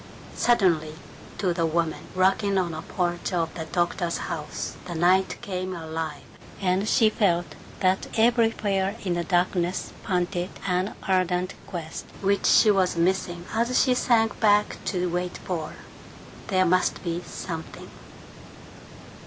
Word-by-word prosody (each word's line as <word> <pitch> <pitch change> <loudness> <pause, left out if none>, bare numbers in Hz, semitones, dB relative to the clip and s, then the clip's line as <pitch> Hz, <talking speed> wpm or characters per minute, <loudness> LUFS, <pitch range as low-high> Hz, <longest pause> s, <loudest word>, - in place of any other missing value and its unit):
Suddenly, 170 -10 +2 0.4
to 185 -4 +1
the 165 -1 +1
woman 165 0 -1
rocking 195 +2 +2
on 180 -2 +1
the 155 0 -5
porch 175 +1 -2
of 165 -2 0
the 160 - -5
doctor's 175 +1 -1
house, 150 -2 -5
the 175 - -5
night 185 +3 +3
came 185 -1 -3
alive, 160 -2 -5 0.4
and 190 +2 +1
she 225 -4 +5
felt 180 -5 +2 0.4
that 185 0 +2
everywhere 220 -4 +2
in 180 -3 0
the 175 0 -1
darkness 175 +1 0
panted 180 -1 -1 0.2
an 185 +1 0
ardent 185 0 +1
quest 165 -3 -6 0.2
which 200 0 +2
she 215 - +6
was 185 -3 +2
missing 175 0 0
as 235 +3 +2
she 255 - +3
sank 230 -3 +2
back 210 -1 +3
to 180 -2 0
wait 180 +1 -2
for 165 -4 -4 0.7
There 185 -2 +3
must 185 +1 +1
be 170 -1 -2
something. 165 -2 -7
180 Hz, 135 wpm, -25 LUFS, 170-195 Hz, 0.7 s, she